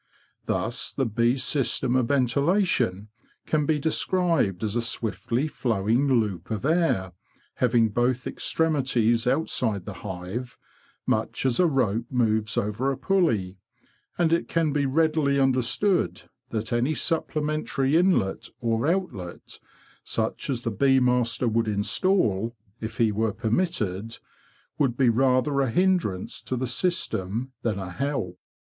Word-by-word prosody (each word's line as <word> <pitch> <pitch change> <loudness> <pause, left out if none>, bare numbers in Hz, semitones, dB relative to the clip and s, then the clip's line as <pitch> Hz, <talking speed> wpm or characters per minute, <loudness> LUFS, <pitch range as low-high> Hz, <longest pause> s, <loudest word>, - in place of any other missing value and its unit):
Thus - - -1
the 135 - -1
bees' 120 +3 +1
system 130 -2 +1
of 125 -2 +2
ventilation 135 - +1 0.4
can 150 -2 0
be 155 - +2
described 160 - +1
as 105 0 -1
a 120 - +1
swiftly 115 +3 -1
flowing 115 -1 0
loop 95 -6 -3
of 110 +2 -3
air, 155 - +1 0.4
having 120 -2 +3
both 125 +3 0
extremities 125 -7 +1
outside 125 - 0
the - - -6
hive, 95 +6 -6 0.5
much - - -1
as 125 -3 +1
a 180 - +5
rope 120 -6 0
moves 110 -3 0
over 110 +7 0
a 135 - -3
pulley, 120 - 0 0.6
and 165 -2 +2
it 170 - +1
can 165 -3 0
be 145 -2 +1
readily 150 -1 +2
under 135 -1 +3
stood 185 - 0 0.3
that 110 +1 -3
any 125 +6 +1
supplementary 155 -3 -1
inlet 165 - +2
or 115 +1 0
outlet—such 160 - -4
as 125 -3 -2
the 115 - -1
bee 135 +5 +3
master 125 -1 +1
would 115 0 +1
instal, 110 - +1 0.2
if 110 0 -6
he 115 -2 +3
were 110 0 0
permitted 110 - -1 0.6
—would 130 -5 +1
be 130 -3 +4
rather 130 +3 +2
a 135 - +1
hindrance 175 - 0
to 130 - -3
the 130 - -1
system 125 - -1
than 110 -4 -1
a 95 -2 -5
help. 135 -5 -3
125 Hz, 135 wpm, -25 LUFS, 110-145 Hz, 0.6 s, a